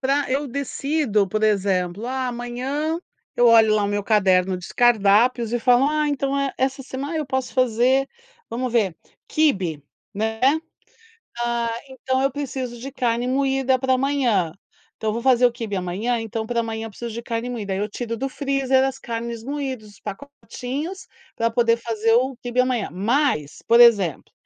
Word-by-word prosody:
pra 275 Hz, 0 st, 0 dB
eu 280 Hz, +2 st, 0 dB
decido, 275 Hz, -5 st, 0 dB
por 215 Hz, +3 st, -2 dB
exemplo: 195 Hz, -1 st, +1 dB
"Ah, 260 Hz, 0 st, -2 dB
amanhã", 255 Hz, +7 st, -3 dB, 0.4 s
eu 240 Hz, -, +5 dB
olho 225 Hz, -2 st, +6 dB
lá 210 Hz, -, +2 dB
o -, -, +1 dB
meu 205 Hz, 0 st, -1 dB
caderno 190 Hz, -3 st, +3 dB
dos 180 Hz, 0 st, -9 dB
cardápios 235 Hz, +1 st, +3 dB
e 240 Hz, -, +1 dB
falo: 245 Hz, +2 st, +4 dB
"Ah, 305 Hz, 0 st, +1 dB
então, 280 Hz, -1 st, -1 dB
eh, 275 Hz, -1 st, -1 dB
essa 265 Hz, +1 st, -1 dB
semana 275 Hz, +5 st, -5 dB
eu 305 Hz, -3 st, -2 dB
posso 260 Hz, -1 st, -2 dB
fazer, 255 Hz, +2 st, +2 dB, 0.4 s
vamos 245 Hz, +1 st, -3 dB
ver, 200 Hz, -8 st, +1 dB, 0.3 s
'quibe'", 190 Hz, -, +1 dB, 0.3 s
né. 220 Hz, +2 st, -2 dB, 1.0 s
"Ah, 235 Hz, -1 st, 0 dB, 0.2 s
então, 260 Hz, 0 st, -2 dB
eu 275 Hz, 0 st, +1 dB
preciso 260 Hz, -3 st, -4 dB
de 270 Hz, +3 st, -6 dB
carne 245 Hz, -2 st, -1 dB
moída 270 Hz, 0 st, +1 dB
pra 260 Hz, 0 st, 0 dB
amanhã.". 255 Hz, -, +1 dB, 0.4 s
Então, 220 Hz, -, -2 dB
eu -, -, -2 dB
vou 235 Hz, -, -3 dB
fazer 250 Hz, -1 st, +5 dB
o 240 Hz, -, +1 dB
quibe 225 Hz, -4 st, -4 dB
amanhã, 195 Hz, +7 st, -1 dB
então, 225 Hz, 0 st, -4 dB
pra 235 Hz, +1 st, -3 dB
amanhã 225 Hz, -1 st, -2 dB
eu -, -, -8 dB
preciso 235 Hz, +3 st, -7 dB
de 235 Hz, -, -5 dB
carne 230 Hz, +1 st, -3 dB
moída. 220 Hz, -5 st, -4 dB
Aí, 190 Hz, -, -1 dB
eu 205 Hz, +1 st, -1 dB
tiro 230 Hz, +2 st, -4 dB
do 270 Hz, +4 st, -2 dB
freezer 270 Hz, -1 st, +1 dB
as 270 Hz, 0 st, -2 dB
carnes 230 Hz, -1 st, -5 dB
moídas, 265 Hz, -6 st, -4 dB
os 205 Hz, -, -19 dB
pacotinhos, 285 Hz, -, -6 dB, 0.3 s
pra 230 Hz, -, +1 dB
poder 230 Hz, 0 st, +2 dB
fazer 230 Hz, -1 st, 0 dB
o 255 Hz, +2 st, +2 dB
quibe 245 Hz, 0 st, -4 dB
amanhã. 250 Hz, -4 st, 0 dB
Mas, 205 Hz, -, 0 dB
por 235 Hz, -, +6 dB
exemplo, 205 Hz, -, +4 dB
240 Hz, 175 wpm, -22 LUFS, 220-265 Hz, 1.0 s, olho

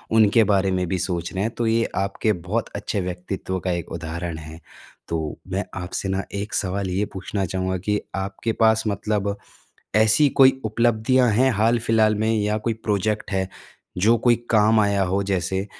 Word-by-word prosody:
उनके 110 Hz, 0 st, +5 dB
बारे 100 Hz, -2 st, +2 dB
में 90 Hz, -1 st, 0 dB
भी 95 Hz, -, -1 dB
सोच 85 Hz, -2 st, -2 dB
रहे 95 Hz, +1 st, -1 dB
हैं। 115 Hz, -, -1 dB
तो 115 Hz, -1 st, 0 dB
ये 115 Hz, +1 st, +2 dB
आपके 100 Hz, +2 st, 0 dB, 0.2 s
बहुत -, -, -1 dB
अच्छे 100 Hz, -, -2 dB
व्यक्तित्व 90 Hz, +1 st, -4 dB
का 90 Hz, +1 st, -2 dB
एक 85 Hz, -1 st, -4 dB
उदाहरण 85 Hz, 0 st, -5 dB
है। 80 Hz, +1 st, -10 dB, 0.5 s
तो 80 Hz, -2 st, -3 dB
मैं -, -, -1 dB, 0.2 s
आपसे 90 Hz, +2 st, -4 dB
ना 95 Hz, +1 st, -1 dB, 0.2 s
एक 105 Hz, -, -6 dB
सवाल 95 Hz, 0 st, -1 dB
ये 95 Hz, +3 st, 0 dB
पूछना 95 Hz, +1 st, -3 dB
चाहूँगा 95 Hz, +1 st, -2 dB
कि 105 Hz, +3 st, -1 dB, 0.2 s
आपके 100 Hz, +4 st, -3 dB
पास 110 Hz, 0 st, +4 dB
मतलब 100 Hz, 0 st, -1 dB, 0.6 s
ऐसी 110 Hz, +7 st, +5 dB
कोई 130 Hz, 0 st, +6 dB
उपलब्धियाँ 120 Hz, +3 st, +2 dB
हैं 130 Hz, +5 st, +3 dB
हाल-फ़िलहाल 110 Hz, 0 st, +2 dB
में 110 Hz, +2 st, 0 dB
या 105 Hz, 0 st, 0 dB
कोई 115 Hz, +1 st, -2 dB
प्रोजेक्ट 105 Hz, +1 st, -1 dB
है, 95 Hz, -1 st, -1 dB, 0.5 s
जो 110 Hz, +5 st, +4 dB
कोई 120 Hz, 0 st, +4 dB
काम 110 Hz, 0 st, +4 dB
आया 100 Hz, -1 st, +2 dB
हो 100 Hz, -, +1 dB
जैसे। 95 Hz, 0 st, -1 dB
100 Hz, 175 wpm, -23 LUFS, 95-110 Hz, 0.6 s, कोई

